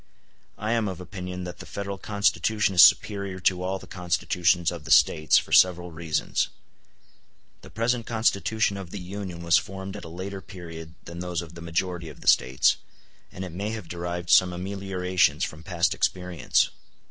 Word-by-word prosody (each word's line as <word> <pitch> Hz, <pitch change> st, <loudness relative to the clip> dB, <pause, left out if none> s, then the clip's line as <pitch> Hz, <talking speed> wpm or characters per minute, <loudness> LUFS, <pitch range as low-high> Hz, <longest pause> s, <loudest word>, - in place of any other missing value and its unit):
I 110 Hz, +1 st, -2 dB
am 115 Hz, -2 st, +1 dB
of 95 Hz, -2 st, -5 dB
opinion 90 Hz, 0 st, -6 dB
that 90 Hz, -1 st, -7 dB
the -, -, -9 dB
Federal 100 Hz, -1 st, -5 dB
Constitution 105 Hz, 0 st, +1 dB
is 90 Hz, -, +9 dB
superior 100 Hz, -3 st, +3 dB
to 90 Hz, -1 st, +2 dB
all 95 Hz, +1 st, -1 dB
the -, -, -12 dB
Constitutions 90 Hz, -1 st, +1 dB
of 85 Hz, -3 st, -7 dB
the -, -, -10 dB
States, 80 Hz, 0 st, +5 dB
for -, -, -1 dB
several 90 Hz, -1 st, +4 dB
reasons. 80 Hz, -1 st, -1 dB, 1.1 s
The -, -, -13 dB
present 115 Hz, +2 st, -1 dB
Constitution 110 Hz, -2 st, +1 dB
of 95 Hz, -3 st, -7 dB
the 100 Hz, -, -7 dB
Union 90 Hz, -2 st, -6 dB
was 85 Hz, -1 st, +5 dB
formed 95 Hz, 0 st, -7 dB
at -, -, -8 dB
a -, -, -8 dB
later 95 Hz, +3 st, -6 dB
period 85 Hz, -4 st, -10 dB
than 85 Hz, 0 st, -8 dB
those 90 Hz, -1 st, -3 dB
of 85 Hz, -1 st, -12 dB
the 85 Hz, -, -10 dB
majority 85 Hz, 0 st, -2 dB
of 75 Hz, -, -13 dB
the -, -, -11 dB
States, 65 Hz, +1 st, +4 dB, 0.5 s
and 95 Hz, -, -6 dB
it 90 Hz, -, -7 dB
may 100 Hz, +5 st, -3 dB
have 110 Hz, -6 st, -6 dB
derived 85 Hz, 0 st, -4 dB
some 90 Hz, -1 st, +6 dB
ameliorations 90 Hz, -4 st, 0 dB
from 75 Hz, -, -4 dB
past 90 Hz, +2 st, 0 dB
experience. 90 Hz, -6 st, 0 dB
90 Hz, 175 wpm, -26 LUFS, 85-100 Hz, 1.1 s, is